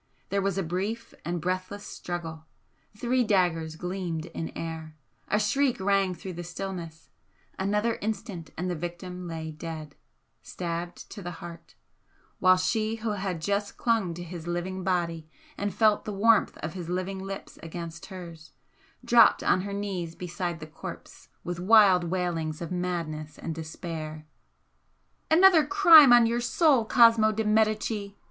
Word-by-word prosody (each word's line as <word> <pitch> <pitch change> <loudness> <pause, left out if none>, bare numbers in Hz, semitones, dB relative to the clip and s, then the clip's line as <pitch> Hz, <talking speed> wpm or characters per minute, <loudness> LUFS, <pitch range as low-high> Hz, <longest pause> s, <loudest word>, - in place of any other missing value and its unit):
There 200 0 0
was 195 -1 -1
a 195 - 0
brief 200 +7 -3
and 175 0 -2
breathless 185 +4 -3
struggle 165 -3 -6 0.5
three 250 +2 +1
daggers 175 -7 +1
gleamed 175 -2 -4
in 160 - -4
air 160 -1 -6 0.3
a 210 - +2
shriek 255 +4 +1
rang 195 -1 +2
through 185 +2 -7
the 175 +1 -6
stillness 175 -2 -7 0.5
another 210 +4 0
instant 200 -6 -4
and 180 +3 -2
the 180 - -1
victim 175 +2 -6
lay 160 -1 -5
dead, 155 -2 -7 0.5
stabbed 175 0 -5
to 205 - -8
the 175 -1 -6
heart, 170 -1 -11 0.6
while 185 0 +6
she 215 +4 0
who 225 -1 -3
had 190 -5 -3
just 200 +3 -1
clung 220 -8 +1
to 175 - -6
his 170 -1 -8
living 180 +2 -3
body 170 -3 -1 0.3
and 205 0 -2
felt 215 +1 +3
the 215 - -3
warmth 220 +2 +3
of 160 +1 -3
his 175 -3 -6
living 185 +2 -2
lips 195 0 -7
against 170 +1 -7
hers, 170 -4 -10 0.5
dropped 235 -2 +6
on 185 - +3
her 200 +1 -5
knees 190 -5 -4
beside 175 -1 -4
the 155 - -7
corpse 155 - -10
with 175 0 -4
wild 190 -2 +6
waitings 170 -3 -2
of 170 -1 -6
madness 170 -4 -3
and 165 - -5
despair. 160 -1 -6 1.0
"Another 340 0 +7
crime 335 -8 +8
on 240 -1 +8
your 235 +1 0
soul, 265 -1 +3
Cosmo 230 -2 +6
de 220 +1 -1
Medicis!" 215 -1 +1
185 Hz, 150 wpm, -27 LUFS, 170-210 Hz, 1.0 s, crime